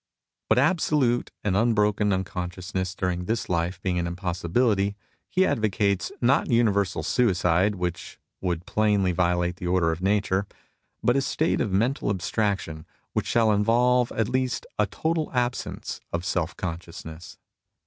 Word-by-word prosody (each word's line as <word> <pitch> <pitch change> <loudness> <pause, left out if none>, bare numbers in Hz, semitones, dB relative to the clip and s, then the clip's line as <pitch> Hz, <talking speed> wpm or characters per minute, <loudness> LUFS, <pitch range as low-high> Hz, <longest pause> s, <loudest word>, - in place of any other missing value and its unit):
But - - +4
absolute 145 -9 +2
and 100 -3 +1
unbroken 105 -1 +2
uncon 95 -2 -2
sciousness 95 0 -4
during 90 -1 -2
this 115 +4 -1
life 85 +1 -1
being 90 -2 0
an 85 - -1
impossibility, 95 +4 0 0.3
he 190 +1 +3
advocates, 100 - 0
not 135 +6 +2
universal 105 -5 +2
suicide, 95 -3 +2
which 90 -2 -4 0.2
would 90 -2 -2
plainly 105 -3 +2
violate 90 0 0
the 90 - -5
order 90 -2 +2
of 80 +2 -4
nature, 100 0 +1 0.6
but 120 - +3
a 140 - +3
state 155 +4 0
of 105 - -1
mental 115 +6 +1
abstraction 95 -4 -2 0.3
which - - -1
shall 115 -2 +3
involve 120 +4 +3
at 110 -2 0
least 130 0 -1
a 105 - +3
total 160 - -2
absence 125 -1 -2
of 85 +1 -3
self 85 -3 -1
consciousness. 85 -1 -7
100 Hz, 140 wpm, -25 LUFS, 90-115 Hz, 0.6 s, But